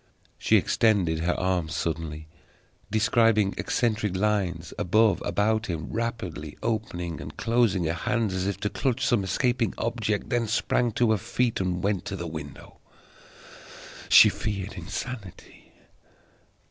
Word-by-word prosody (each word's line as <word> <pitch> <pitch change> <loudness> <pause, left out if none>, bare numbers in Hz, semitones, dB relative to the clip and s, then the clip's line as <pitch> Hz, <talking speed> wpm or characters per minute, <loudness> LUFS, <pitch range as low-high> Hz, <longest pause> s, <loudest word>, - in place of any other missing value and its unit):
She - - +4
extended 95 -8 +2
her 85 +2 0
arms 90 -5 -1
suddenly, 80 -1 -3 0.6
describing 110 -1 +3
eccentric 110 -5 0
lines, 95 -5 -1
above, 110 +3 +3
about 110 +5 0
him, 80 -5 -4
rapidly 100 -10 -4
opening 95 -7 -3
and - - -9
closing 115 -6 +2
her 80 0 0
hands 115 +2 -1
as 95 0 -1
if 100 -2 -2
to 105 - 0
clutch 130 -4 -1
some 115 -5 +2
escaping 120 +2 0
object; 110 -3 -2
then 120 -2 +1
sprang 120 +2 +1
to 120 0 +2
her 110 - +2
feet, 120 0 -1
and 90 -1 -2
went 100 -2 0
to 100 - -4
the 85 -2 -5
window. 80 -3 -9 1.3
She - - +9
feared 100 -1 -4
insanity. 100 +2 -8
100 Hz, 135 wpm, -26 LUFS, 90-115 Hz, 1.3 s, She